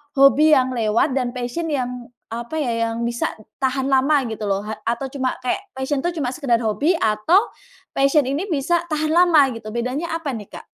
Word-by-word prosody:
hobi 290 +3 +6
yang 260 -1 +2
lewat 230 +3 +1
dan 255 -2 -2
passion 250 +7 -3
yang 250 -5 -3 0.2
apa 235 +6 -5
ya, 230 -4 0
yang 230 +1 -4
bisa 235 0 -1 0.3
tahan 265 0 0
lama 275 +2 +4
gitu 220 -1 -5
loh, 195 0 0
ha 215 +1 -6
atau 240 +4 -2
cuma 260 -1 -2
kayak 255 +10 -2
passion 265 +2 -2
itu 340 +2 -2
cuma 250 - 0
sekedar 245 -3 0
hobi 240 - +1
atau 320 - +2 0.4
passion 275 +2 +3
ini 280 +7 -2
bisa 345 0 0
tahan 310 -2 -1
lama 325 -4 +5
gitu, 225 -3 -7
bedanya 255 +8 -2
apa 330 -3 -3
nih, 210 - -8
Kak? - - -11
265 Hz, 190 wpm, -21 LUFS, 235-305 Hz, 0.4 s, hobi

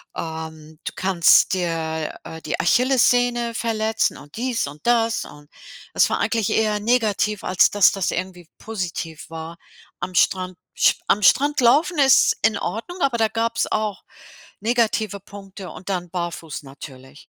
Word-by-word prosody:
ähm, 160 -1 -7
du - - -4
kannst 180 -1 +4
dir, 160 -3 -2
äh, 160 0 -9
die 155 - -3
Achillessehne 245 +1 +2
verletzen 220 -1 0
und 145 0 -14
dies 245 - -1
und 145 +6 -12
das” 230 -1 +2
und 145 0 -14 0.4
das - - +4
war - - 0
eigentlich 225 -3 0
eher 215 -1 +1
negativ, 215 -3 0
als 185 - +3
dass 205 -3 +5
das 195 -3 -1
irgendwie 180 -3 -5
positiv 175 -7 -5
war. 165 +1 -7 0.4
Am 185 - -5
Strand 185 0 +1 0.2
sch - - +4
am 205 0 +2
Strand 290 +8 +4
laufen 300 +8 +3
ist 275 0 +5
in 220 - +3
Ordnung, 230 - -5
aber 265 -4 +1
da 220 -1 +2
gab's 230 0 -1
auch 215 -2 -2 0.6
negative 220 -3 0
Punkte 195 -1 -11
und 185 +2 -10
dann 180 -2 -3
barfuß 170 -3 -5
natürlich. 135 0 -12
200 Hz, 150 wpm, -22 LUFS, 165-230 Hz, 0.6 s, dass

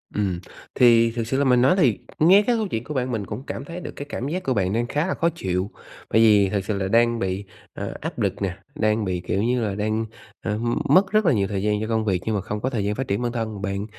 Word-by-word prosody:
Ừm, 95 -4 0 0.4
thì 115 -2 +5
thực 115 -1 -3
sự 130 - 0
là 140 - +2
mình 125 -2 +4
nói 135 +8 +5
thì 130 - +3 0.2
nghe 185 +6 +7
cái 245 - +3
câu 220 -2 -1
chuyện 115 -10 -3
của 150 - -6
bạn, 130 -2 -1
mình 110 -4 -2
cũng 130 - -6
cảm 135 - -5
thấy 170 +4 -7
được - - -7
cái 145 - -6
cảm 130 - -4
giác 180 +5 -3
của 130 - 0
bạn 95 -4 0
đang 120 +2 0
khá 150 +6 -1
là - - 0
khó 170 - +1
chịu. 95 - -2 0.4
Bởi 110 - +4
vì 105 -3 +5
thực 100 -1 -2
sự 105 -1 -1
là 95 -1 -1
đang 115 +3 +3
bị, 95 0 -2 0.3
ờ, - - -5
áp - - -5
lực 100 +1 -1
nè, 95 -1 -2 0.2
đang 110 -5 +1
bị 90 -2 -1
kiểu 100 - 0
như 125 +1 +1
là, 105 -3 -1
đang, 110 +2 -1 0.4
ờm, 115 +3 -1
mất 190 +7 +5
rất 215 -1 +3
là 170 - +4
nhiều 100 -4 +1
thời 95 -1 -3
gian 105 0 +1
cho 110 - -2
công 110 -1 0
việc 95 -4 0
nhưng 110 - 0
mà 100 - 0
không 105 +3 -5
có 130 - 0
thời 115 -6 -2
gian 105 +1 -1
phát 135 +2 -3
triển 100 +4 -1
bản 120 -1 -1
thân, 110 -4 -4
bạn 100 +1 -2
110 Hz, 285 wpm, -23 LUFS, 100-130 Hz, 0.4 s, nghe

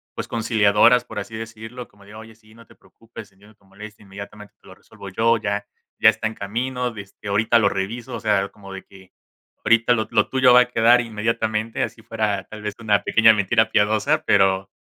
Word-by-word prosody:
pues - - -5
conciliadoras, 115 +1 +3
por - - -7
así 110 - -8
decirlo, 115 +2 -9
como 100 0 -22
de: 105 - -14
"Oye, 110 0 -12
sí, 110 0 -23
no 115 - -17
te - - -19
preocupes, 110 -3 -15
entiendo 100 +2 -21
tu 100 - -31
molestia, 105 +2 -13
inmediatamente 100 +1 -12
te - - -22
lo 95 - -13
resuelvo 100 0 -13
yo, 115 +4 +1
ya 105 -1 -3 0.3
ya - - +7
está - - -3
en 110 - -7
camino, 125 +3 -4
este, 100 +1 -11
ahorita 115 +3 +2
lo 100 -2 +2
reviso, 115 +6 -5
o - - -5
sea, 100 -3 0
como 100 -1 -13
de 95 - -9
que 95 -1 -19 0.5
ahorita 115 +1 +3
lo 110 -2 -2
lo 110 -2 +2
tuyo 130 -1 +4
va 125 - +7
a 125 - -1
quedar 120 +1 +4
inmediatamente", 110 0 -2
así 115 - -6
fuera 110 -4 -2
tal 110 -1 -10
vez 105 -1 -4
una 105 -3 +1
pequeña 110 0 +5
mentira 110 +2 +1
piadosa, 105 +1 +1
pero 95 0 +2
110 Hz, 205 wpm, -21 LUFS, 100-115 Hz, 0.5 s, ya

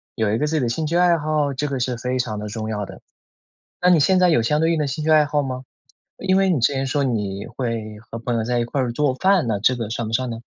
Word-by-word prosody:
有 110 -2 0
一 110 - 0
个 150 - +1
自 160 - -1
己 155 - +1
的 125 - 0
兴 155 +6 -2
趣 170 - 0
爱 175 -1 +5
好， 150 -2 0
这 145 +3 -2
个 135 -2 -3
是 125 0 -1
非 125 +2 -2
常 110 -4 -2
的 105 - -5
重 110 +1 -5
要 105 -2 -3
的。 - - -11 0.8
那 180 - +3
你 170 - +5
现 185 +6 +4
在 180 -1 +5
有 155 -8 +3
相 150 +7 +1
对 165 +1 +2
应 165 - 0
的 150 - 0
兴 145 +3 -4
趣 160 - +1
爱 155 -1 +6
好 145 0 0
吗？ 130 -1 -4 0.6
因 190 0 +2
为 195 - +3
你 165 -7 +2
之 115 - +3
前 135 0 -1
说 140 +1 0
你 105 -6 -2
会 115 -4 -3
和 115 +1 -9
朋 120 +1 -2
友 115 - 0
在 120 +1 0
一 - - +1
块 140 - -3
儿 125 -2 -1
做 140 0 +1
饭， 190 -3 +2
那 105 -3 0
这 125 +4 +3
个 115 -3 -4
算 115 -1 -3
不 110 - -6
算 130 +1 0
呢？ 115 - -4
130 Hz, 325 characters per minute, -22 LUFS, 115-150 Hz, 0.8 s, 爱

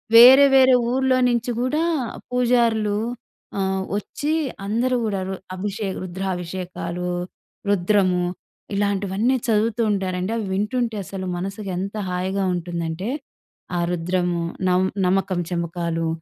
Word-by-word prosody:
వేరే, 255 +4 +10
వేరే 260 -1 +7 0.2
ఊర్లో 260 0 +2
నుంచి 240 0 0
గూడా 295 +6 +1 0.5
పూజారులు 235 -4 +2 0.6
ఆహ్, 190 0 0
ఒచ్చి 290 +8 -3 0.3
అందరూ 240 +5 +1
గూడా 200 -3 -1
రు 190 - -3 0.2
అభిషేక, 200 0 -3
రుద్రాభిషేకాలు, 180 -1 -4 0.6
రుద్రము 185 -2 +2 0.5
ఇలాంటివన్నీ 200 +4 +1
చదువుతూ 225 +1 +2
ఉంటారండి. 185 0 -1
అవి 215 - -2
వింటుంటే 225 +3 -1
అసలు 190 0 -6
మనసుకెంత 195 +1 -4 0.2
హాయిగా 190 +2 -1
ఉంటుందంటే, 170 +3 -3 0.7
ఆ - - +1
రుద్రము, 175 0 0 0.3
నమ్ 185 +1 +3 0.2
నమకం 185 -1 +1
చెమకాలు, 170 -1 -2
195 Hz, 105 wpm, -22 LUFS, 180-225 Hz, 0.7 s, వేరే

